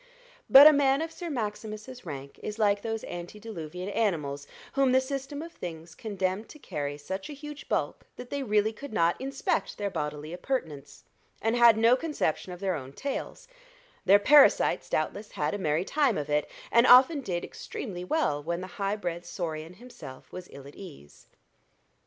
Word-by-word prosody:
But 275 +2 +11
a 305 - +10
man 280 +1 +3
of 325 - -5
Sir 345 +1 -6
Maximus's 215 - -5
rank 140 -2 -8
is 210 0 -5
like 205 -2 +2
those 225 0 -3
antediluvian 180 -1 -7
animals 150 -10 -1 0.3
whom 270 -2 +3
the 260 - +6
system 275 +2 -4
of 335 - -9
things 165 -1 -8
condemned 195 +1 -3
to - - -12
carry 145 - -4
such 190 - -6
a - - -6
huge 295 +1 -9
bulk - - -2
that 245 0 -10
they 285 - -2
really 215 -3 +1
could 280 +2 -9
not 170 +1 +1
inspect 270 -7 -2
their 205 -1 -2
bodily 150 +1 -4
appurtenance, 160 - -4 0.4
and 225 +2 0
had 235 -2 +7
no 230 +2 +5
conception 255 - -2
of 180 - -8
their 190 -1 0
own 135 -4 -6
tails: 275 - -5 0.6
their 200 - +7
parasites 285 +8 +5
doubtless 210 +1 -2
had - - -1
a 205 - -3
merry 160 0 0
time 285 -4 +2
of 150 0 -4
it, 150 0 +1 0.2
and 235 +2 +5
often 265 +4 +7
did 180 -8 -3
extremely 180 -7 -7
well 180 - 0
when 170 +3 -3
the - - -5 0.2
high 195 +1 +1
bred 175 -4 -4
saurian 165 -2 -5
himself 235 - -12
was 180 -1 -9
ill 140 -1 -11
at 140 - -12
ease. 150 - -13
205 Hz, 175 wpm, -28 LUFS, 165-255 Hz, 0.6 s, But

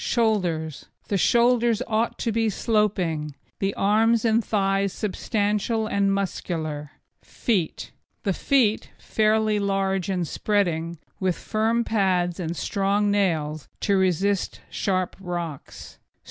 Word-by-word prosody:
SHOULDERS 180 - 0 0.2
The 200 - +1
shoulders 240 +1 +3
ought 225 0 0
to 230 - -1
be 225 0 +1
sloping, 185 - 0 0.2
the 195 0 -1
arms 220 +3 +3
and 225 0 +3
thighs 195 -2 +1
substantial 210 +2 -1
and 200 -2 +1
muscular. 160 -6 -3 0.3
FEET 195 - -2 0.3
The 195 - +1
feet, 235 -2 +2
fairly 215 -1 +1
large 195 -2 0
and 180 -3 -1
spreading, 170 -5 0 0.2
with 185 -2 +1
firm 225 +2 0
pads 185 -6 +1
and 170 -1 -3
strong 200 +1 +1
nails 155 -7 0
to 200 - +2
resist 190 +1 +1
sharp 185 -3 -1
rocks. 175 -6 -6
200 Hz, 115 wpm, -24 LUFS, 175-215 Hz, 0.3 s, shoulders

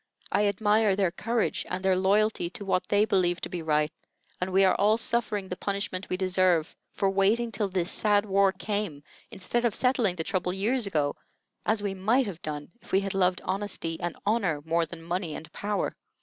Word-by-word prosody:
I 205 - +3
admire 210 0 +3
their 190 -3 +1
courage 230 +5 -1
and 185 +1 -3
their 190 -1 +4
loyalty 195 -1 +2
to 200 +3 -8
what 185 -1 0
they 205 +1 +3
believe 180 -4 +1
to - - -4
be 175 - -4
right; 150 -1 +1 0.5
and 185 +1 -1
we 190 +1 +4
are 185 - +4
all 210 +2 +3
suffering 225 -4 -1
the 180 - -4
punishment 200 -1 -3
we 185 - -1
deserve 185 -3 +2 0.2
for 195 - 0
waiting 210 +5 +2
till 205 -1 -1
this 180 -2 0
sad 205 -1 +2
war 195 -1 +3
came, 195 -6 -3 0.3
instead 235 +6 -2
of 235 -4 +1
settling 250 -7 +2
the 165 - -3
trouble 180 0 -1
years 215 +4 0
ago, 150 -6 0 0.5
as 215 -1 +1
we 200 -1 -1
might 220 +8 +2
have 185 -5 -7
done 150 +1 -5
if - - -16
we 190 - +4
had 195 -1 -3
loved 185 -1 +2
honesty 185 -4 -2
and 175 - -3
honor 200 -8 +1
more 165 0 +1
than 165 -1 -9
money 175 -1 -3
and 160 - -9
power." 205 0 -2
195 Hz, 200 wpm, -27 LUFS, 180-210 Hz, 0.5 s, their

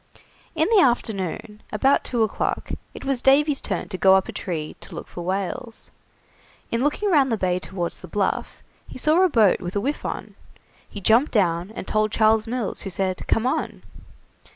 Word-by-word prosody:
In 315 0 +2
the 425 -4 +6
afternoon, 210 - -1
about 265 +6 +2
two 235 -3 0
o'clock, 220 - -2 0.2
it - - -10
was 270 -3 0
Davy's 280 +2 +4
turn 190 -4 -3
to 185 -3 -5
go 190 0 +6
up 190 - +2
a - - -5
tree 160 -4 -5
to - - -10
look - - -7
for 175 - -8
whales. 195 +6 -4 0.8
In 230 +2 0
looking 380 +8 0
round 275 -6 +4
the 225 - +1
Bay 180 -2 0
towards 180 -2 -4
the 185 - -10
Bluff, 195 +3 -2 0.2
he - - -10
saw 310 +7 +3
a 375 - +5
boat 220 - +4
with 180 +1 -5
a - - +2
whiff 280 +8 -2
on. - - -5 0.6
He 205 - -8
jumped 230 +9 +4
down, 175 -4 +1
and - - -6
told 215 0 +1
Charles 220 +1 +3
Mills, 235 -3 -3
who 195 - -5
said: 185 0 -3
"Come 225 - +1
on." 255 - -2
215 Hz, 190 wpm, -23 LUFS, 190-260 Hz, 0.8 s, the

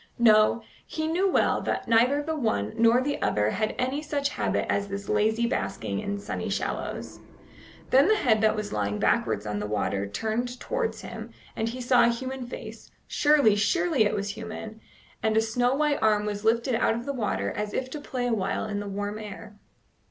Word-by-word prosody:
No, 220 0 +5 0.2
he 315 - -3
knew 355 +5 +1
well - - +2
that - - -2
neither 245 +6 +3
the 320 +1 -2
one 110 - -1
nor 230 +2 +4
the 285 +1 -2
other 105 0 +1
had 215 +2 -1
any 260 +4 -1
such 290 -2 -1
habit - - -1
as 200 0 0
this 200 0 -6
lazy 220 +2 +2
basking 105 - -2
in 205 0 -3
sunny 200 - -4
shallows. - - -4 0.7
Then 270 +3 +6
the 435 - +5
head 225 - +2
that 220 0 +3
was 210 -1 -4
lying 105 0 -1
backwards 105 -1 +1
on 105 -1 -2
the 105 - -3
water 100 -1 -1
turned 230 - -3
towards - - -2
him, - - -8 0.3
and 225 +1 -1
he 255 +2 -6
saw 245 0 +4
a - - +4
human 255 +1 -3
face - - -9 0.2
surely, 290 -8 +4
surely 320 - +2
it 205 - +1
was 200 0 -2
human! 220 +1 -7 0.4
and 220 0 +1
a - - +6
snow 245 +3 +1
white 300 0 +1
arm 210 -1 +3
was 205 0 -3
lifted 230 +3 +2
out 225 0 +2
of 235 +1 -5
the 280 - -2
water 100 - -1
as 210 0 -3
if 255 - -2
to 300 - -5
play 255 -3 -3
awhile 220 -6 -1
in 205 -1 -3
the 205 0 -5
warm 205 +2 -4
air. 210 0 -9
225 Hz, 195 wpm, -27 LUFS, 205-260 Hz, 0.7 s, Then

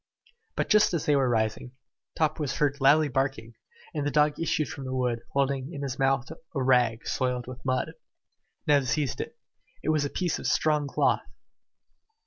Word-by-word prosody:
But - - 0
just 210 -4 +4
as 160 - -2
they 150 - +3
were 135 -2 +2
rising, 110 +2 -1 0.4
Top 155 0 +1
was 145 -4 -2
heard 145 -2 0
loudly 150 +3 +5
barking; 135 -4 -2 0.4
and 150 -3 -2
the 145 - 0
dog 150 0 +2
issued 155 -2 0
from 135 - -7
the 130 0 -3
wood, 125 -2 0
holding 140 +1 0
in 145 -4 -6
his 135 -2 -4
mouth 135 -1 +2
a - - -8 0.3
rag 120 -3 +3
soiled 125 -1 -1
with 130 +1 -9
mud. 130 -1 0 0.7
Neb 145 -2 +4
seized 130 +1 -1
it. - - -8 0.5
It - - -1
was 155 -2 +2
a 145 - -1
piece 175 0 -1
of - - -3
strong 150 -2 +2
cloth! - - +2
135 Hz, 180 wpm, -27 LUFS, 125-150 Hz, 0.7 s, loudly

